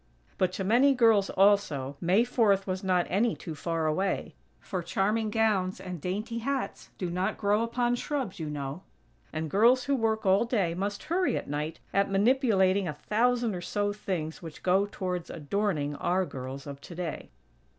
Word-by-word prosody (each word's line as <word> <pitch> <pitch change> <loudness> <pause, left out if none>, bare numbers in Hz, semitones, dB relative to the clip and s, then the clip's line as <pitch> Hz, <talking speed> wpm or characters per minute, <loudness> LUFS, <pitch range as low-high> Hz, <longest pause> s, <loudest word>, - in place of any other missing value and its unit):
But 185 -1 +2
to 195 - -3
many 250 +8 +4
girls, 225 -5 +4
also, 190 -9 +2
May 185 +6 +4
Fourth 215 -6 +2
was 185 0 -3
not 180 -2 +2
any 220 +4 +1
too 165 - -7
far 165 +1 -2
away; 185 +5 -1 0.3
for 185 - -4
charming 210 +5 0
gowns 210 -4 +1
and 180 -4 -7
dainty 210 - -3
hats 275 +3 -3
do 180 -2 -3
not 185 +4 -1
grow 205 +1 +2
upon 240 +1 0
shrubs, 250 -6 -3
you 155 -2 -3
know; 145 +2 -5 0.5
and 160 0 -3
girls 235 - +4
who 280 +2 +1
work 220 -3 0
all 195 +3 +4
day 205 -8 0
must 200 +3 -3
hurry 360 +3 +1
at - - -5
night, 150 +3 -3
at 200 +1 +2
manipulating 200 -3 +3
a 155 - -2
thousand 235 +7 +1
or 180 - -4
so 205 +2 -1
things 175 -6 -4
which 165 -3 -10
go 190 +2 +3
towards 180 -2 -3
adorning 155 -2 -1
our 185 +1 +1
girls 135 0 -7
of 140 -1 -8
today. 170 0 -6
195 Hz, 170 wpm, -28 LUFS, 170-225 Hz, 0.5 s, many